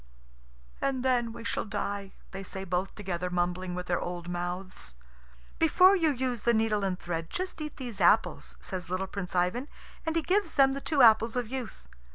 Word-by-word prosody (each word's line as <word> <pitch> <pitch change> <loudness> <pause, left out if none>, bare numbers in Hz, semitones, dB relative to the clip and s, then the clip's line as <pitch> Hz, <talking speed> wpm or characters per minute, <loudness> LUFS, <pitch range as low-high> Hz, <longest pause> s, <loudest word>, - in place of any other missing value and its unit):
"And 265 -2 0
then 245 -3 +2
we 235 0 -9
shall - - -1
die!" 200 -1 -4 0.2
they 195 - -6
say 190 0 -6
both 185 +1 -2
together, 180 -3 -3
mumbling 180 +1 -1
with 180 0 -4
their 175 -1 0
old 175 -1 -5
mouths. 175 - -5 0.6
"Before 365 +4 +6
you 330 -4 +3
use 255 -4 -1
the 235 +1 +3
needle 220 -2 +1
and 190 -2 0
thread, 165 -2 -4
just 370 -3 -4
eat 300 -1 -6
these 240 -7 -6
apples," 210 +6 +3
says 185 -3 -5
little 185 +1 -1
Prince 190 -2 -6
Ivan, 180 +10 +1 0.4
and 320 0 -2
he 330 - +1
gives 375 -1 +1
them 270 -1 +5
the 275 - -4
two 285 -4 +3
apples 225 0 +6
of 245 -3 -1
youth. 240 - -6
210 Hz, 190 wpm, -29 LUFS, 180-260 Hz, 0.6 s, Before